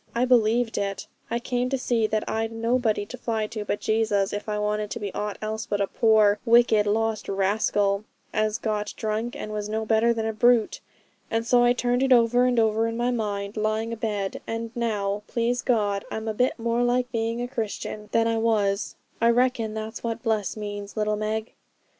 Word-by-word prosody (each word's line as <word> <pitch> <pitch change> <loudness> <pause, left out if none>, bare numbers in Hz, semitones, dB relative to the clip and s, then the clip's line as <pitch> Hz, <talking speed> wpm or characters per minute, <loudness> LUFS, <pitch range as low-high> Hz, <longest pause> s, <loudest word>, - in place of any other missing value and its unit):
I 240 +2 +2
believed 235 -1 +3
it. 200 -1 -3 0.2
I 235 - 0
came 245 +1 -1
to 270 - 0
see 235 -3 +1
that 215 0 -1
I'd 225 0 -1
nobody 230 -2 0
to 250 +4 -9
fly 220 -2 -1
to 215 0 -5
but 205 - -2
Jesus 215 -3 +1
if 205 +1 -4
I 210 - -1
wanted 210 0 -1
to - - -4
be 205 -2 -5
aught 210 -1 -3
else 220 +1 -3
but 205 - -1
a 200 - +2
poor, 215 -1 +3
wicked, 230 -3 +4
lost 220 +1 0
rascal, 200 +1 +1 0.3
as 215 0 +1
got 210 -2 -3
drunk, 220 +2 -2
and 215 - -6
was 210 0 -3
no 220 +1 -2
better 225 +2 +3
than 225 -1 -1
a 220 - -1
brute. 240 0 +3 0.5
And 225 0 -1
so 240 0 +4
I 240 0 +5
turned 245 0 0
it 265 0 +1
over 245 0 +5
and 250 -1 +1
over 220 0 +2
in 230 0 -3
my 240 +1 +1
mind, 205 -3 -3
lying 215 +1 -1
abed; 210 -4 -3
and 230 0 -4
now, 210 -4 -1
please 240 +1 0
God, 205 -5 +1
I'm 220 0 -5
a 220 - -1
bit 250 +4 +1
more 235 0 0
like 245 +1 +1
being 230 0 -1
a 245 - -2
Christian 215 -3 -5
than 230 0 +3
I 230 0 +1
was. 210 -3 +1 0.3
I 230 - +5
reckon 235 -2 +1
that's 220 +1 -5
what 230 -1 -3
bless 220 -3 -1
means, 205 0 -6
little 210 0 +1
Meg.' 215 +1 -3
220 Hz, 200 wpm, -25 LUFS, 210-235 Hz, 0.5 s, I